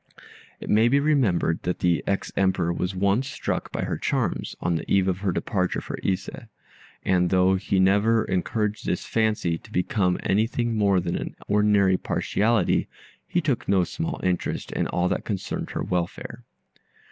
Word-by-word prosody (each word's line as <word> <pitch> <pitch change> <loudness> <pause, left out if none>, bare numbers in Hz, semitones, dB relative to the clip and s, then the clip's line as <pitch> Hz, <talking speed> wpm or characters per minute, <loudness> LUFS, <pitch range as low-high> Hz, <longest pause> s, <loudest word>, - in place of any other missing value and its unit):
It - - -8
may 110 +2 +5
be 140 +4 +4
remembered 125 - +1
that 90 - -2
the 85 -2 +1
ex 100 - -1
Emperor 95 -3 +1
was 90 +2 -3
once 100 +7 +1
struck - - -3
by - - -3
her - - -3
charms, - - -1
on 85 - 0
the 80 - -4
eve 95 -1 +3
of 95 -1 0
her 95 -1 0
departure 90 0 -1
for - - -6
Ise; 95 -1 -1 0.8
and 90 -2 +2
though 95 +1 +4
he 95 0 0
never 100 +4 +3
encouraged 105 +3 -1
this 90 - -1
fancy 105 -7 0
to - - -17
become 90 0 +1
anything 115 +3 0
more 100 -3 +3
than 85 -1 -2
an - - -5
ordinary 100 -2 +3
partiality, 110 +4 +1 0.4
he 175 - 0
took 140 -6 -1
no 95 -2 +4
small 165 - -4
interest 90 -1 -1
in - - -1
all 90 0 0
that - - -1
concerned 100 -4 -4
her - - -3
welfare. 90 -1 -4
95 Hz, 170 wpm, -25 LUFS, 90-110 Hz, 0.8 s, may